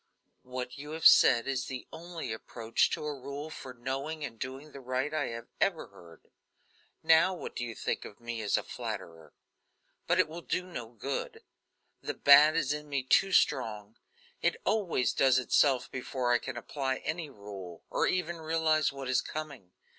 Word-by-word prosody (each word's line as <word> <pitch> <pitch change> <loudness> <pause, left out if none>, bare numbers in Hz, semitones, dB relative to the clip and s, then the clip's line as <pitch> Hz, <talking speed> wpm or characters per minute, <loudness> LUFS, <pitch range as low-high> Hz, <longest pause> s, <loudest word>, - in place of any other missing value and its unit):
"What 125 0 -6
you 150 +2 -7
have 160 -1 -5
said 120 -1 +7
is 130 -1 -1
the 130 -2 -6
only 165 -7 -6
approach 115 +1 0
to - - -3
a 150 - -2
rule 140 +3 -7
for 130 - -8
knowing 135 +5 -4
and 115 -4 -9
doing 135 +4 -6
the 140 - -9
right 130 +3 -2
I 155 -3 0
have 115 0 -6 0.2
ever - - +1
heard. 85 -2 -17 0.7
Now 160 +4 +5
what - - -7
do 120 - -3
you 115 -2 -5
think - - -2
of 100 - -11
me 120 -1 -5
as 105 - +1
a - - -2
flatterer? 80 -3 -7 0.7
But - - +3
it - - +4
will 165 +2 -8
do 180 - -1
no 170 -11 -6
good; 130 +4 -5 0.6
the - - -4
bad 145 +2 +7
is 145 -3 +1
in 150 0 -7
me 140 -2 -1
too 195 +9 +3
strong; 110 - +1 0.5
it 460 - +1
always 180 - +1
does 130 -1 +4
itself 130 0 +2
before 125 -1 -2
I 120 - +4
can 130 -2 -6
apply 135 +2 -2
any 160 -1 -3
rule, 100 - -10
or - - +2
even 175 -2 -1
realize 160 -1 +1
what 135 -1 -7
is 130 -1 +2
coming." 145 -12 -7
135 Hz, 180 wpm, -30 LUFS, 120-155 Hz, 0.7 s, said